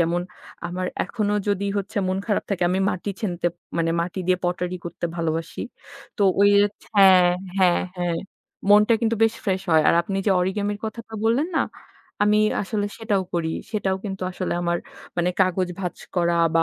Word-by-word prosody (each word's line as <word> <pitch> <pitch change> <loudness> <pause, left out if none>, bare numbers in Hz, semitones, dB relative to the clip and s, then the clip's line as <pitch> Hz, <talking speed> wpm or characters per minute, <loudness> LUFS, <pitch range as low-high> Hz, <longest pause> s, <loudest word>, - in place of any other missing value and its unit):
যেমন 170 +1 +1 0.5
আমার 180 +1 -3 0.2
এখনো 210 0 -1 0.2
যদি 200 0 0
হচ্ছে 200 +3 -6
মন 185 0 0
খারাপ 210 -3 0
থাকে, 190 -3 0
আমি 185 - +1
মাটি 185 +3 -3
ছেনতে 175 -4 -1 0.3
মানে 165 0 +1
মাটি 175 +2 -3
দিয়ে 185 0 +3
পটারি 180 0 -1
করতে 170 - -5
ভালোবাসি। 165 -1 -2 0.6
তো 205 - 0 0.2
ওই 200 0 +6 0.2
ওচ 205 - -10 0.2
হ্যাঁ, 185 -2 +7 0.3
হ্যাঁ, 180 -2 +4 0.2
হ্যাঁ, 175 -1 0 0.5
মনটা 210 +2 +6
কিন্তু 230 -1 +1
বেশ 225 0 +4
ফ্রেস 190 -3 0
হয়। 160 -1 +5
আর - - +5
আপনি 195 +3 -3
যে - - +4
অরিগেমির 205 +3 -1
কথাটা 225 +1 -7
বললেন 255 +9 +2
না, - - +4 0.6
আমি 210 0 +4 0.2
আসলে 205 +1 -2
সেটাও 210 -4 0
করি। 165 -2 0 0.2
সেটাও 195 -3 0
কিন্তু 195 -2 -4
আসলে 185 0 -3
আমার 170 0 +1 0.4
মানে 175 0 +2
কাগজ 185 -1 +2
ভাঁজ 180 -2 -3 0.2
করা 170 -1 +2 0.2
বা 165 - +5
190 Hz, 175 wpm, -23 LUFS, 175-205 Hz, 0.6 s, হ্যাঁ